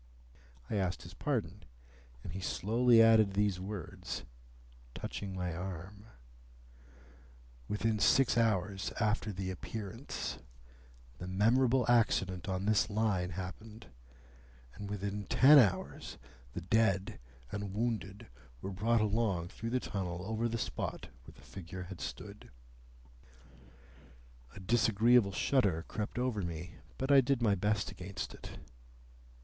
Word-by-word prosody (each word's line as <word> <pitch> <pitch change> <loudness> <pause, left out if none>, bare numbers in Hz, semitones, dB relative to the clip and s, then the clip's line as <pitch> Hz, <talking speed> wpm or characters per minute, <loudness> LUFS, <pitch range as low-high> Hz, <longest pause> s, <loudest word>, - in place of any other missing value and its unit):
I 105 - -2
asked 95 -2 -1
his 90 0 -11
pardon, 105 - -2 0.6
and 80 - -7
he 95 - -4
slowly 115 +5 +4
added 110 -3 +5
these 100 -3 +1
words, 95 -3 -6 0.7
touching 95 -2 -5
my 90 -2 -2
arm,— 95 +4 -7 1.6
"Within 110 +1 0
six 135 +4 +4
hours 100 -4 +1
after 110 -1 0
the 95 -1 -4
Appearance, 110 - -6 0.8
the 90 - -6
memorable 120 +6 +3
accident 100 -5 +2
on 95 +1 -2
this 105 0 +3
Line 100 -4 0
happened, 95 +2 -8 0.8
and 100 +2 -7
within 100 0 -4
ten 145 +3 +8
hours 105 -8 0 0.4
the 90 - -4
dead 95 0 +1 0.3
and 100 -1 -4
wounded 110 -3 -2 0.3
were 95 - -5
brought 110 +4 +2
along 105 -5 0
through 115 +2 -5
the 130 +2 +1
tunnel 90 -5 -4
over 110 +2 -1
the 115 - -2
spot - - -4 0.2
where - - -13
the - - -18
figure 90 0 -8
had 90 0 -9
stood." - - -7 2.1
A - - -9
disagreeable 115 +1 +4
shudder 95 - +1
crept 105 +1 -4
over 125 -4 0
me, 85 0 -6 0.2
but 135 +2 -1
I 140 -1 +8
did 135 0 +1
my 110 -4 +3
best 105 +2 0
against 95 +2 -6
it. - - -10
105 Hz, 125 wpm, -33 LUFS, 95-115 Hz, 2.1 s, ten